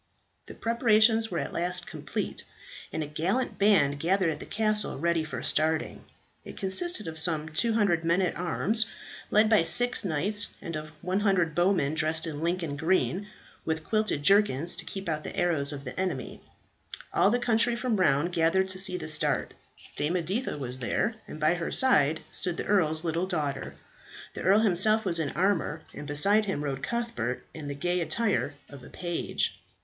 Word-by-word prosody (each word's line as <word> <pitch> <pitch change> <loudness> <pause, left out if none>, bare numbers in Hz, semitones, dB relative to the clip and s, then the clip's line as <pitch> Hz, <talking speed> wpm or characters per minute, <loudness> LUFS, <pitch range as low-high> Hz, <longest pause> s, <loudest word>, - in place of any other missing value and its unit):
The - - -10
preparations 225 -1 +3
were 175 - -3
at - - -4
last 175 +1 -1
complete, - - -5 0.5
and 160 - -3
a - - -4
gallant 175 - -2
band 160 -9 +3
gathered 180 +1 +1
at 150 - -6
the - - -9
castle 215 -1 0
ready 170 +2 0
for 125 -6 -6
starting. 160 +1 -1 0.4
It - - -11
consisted 215 - -1
of 160 0 -5
some 160 -1 +1
200 200 -1 +1
men 170 +2 +2
at 180 - -1
arms 205 +5 0 0.4
led 215 +1 +4
by 215 -3 +4
six 235 +11 +4
knights, 195 +4 -1
and 165 - -6
of 155 0 -6
100 185 -3 +1
bowmen 175 -4 +1
dressed 160 0 0
in 155 -2 -6
Lincoln 170 -3 -2
green, 185 +4 0 0.4
with 160 -1 -2
quilted 215 -9 -1
jerkins 175 -5 +4
to - - -5
keep 195 -1 -6
out 155 -2 -2
the - - -7
arrows 160 -5 +1
of 140 -1 -7
the 125 - -7
enemy. 180 -8 -4 0.7
All - - +4
the 240 - +2
country 240 0 +2
from 235 -4 -1
around 165 -1 +2
gathered 175 +4 +2
to 185 0 -1
see 185 -1 +5
the - - -6
start. 150 -1 0 0.4
Dame 150 +4 -1
Editha 185 +5 -2
was 130 -2 -3
there, 130 - -1
and 155 - -9
by 155 +2 +3
her 175 -1 -4
side 160 - +4
stood 175 -2 -2
the - - -4
earl's 160 -6 +2
little 170 +2 -1
daughter. 145 -7 -3 0.6
The - - -7
earl 200 +4 +4
himself 215 +2 +4
was 170 -3 +1
in 150 -3 -1
armour, 175 -4 0
and 145 - -8
beside 200 +9 +4
him 190 -7 -3
rode 135 -2 -4
Cuthbert 235 - -3
in 155 -3 -8
the 140 - -5
gay 175 +5 -1
attire 200 -5 0
of 140 -3 -13
a - - -12
page. 175 -2 -3
175 Hz, 180 wpm, -27 LUFS, 155-205 Hz, 0.7 s, see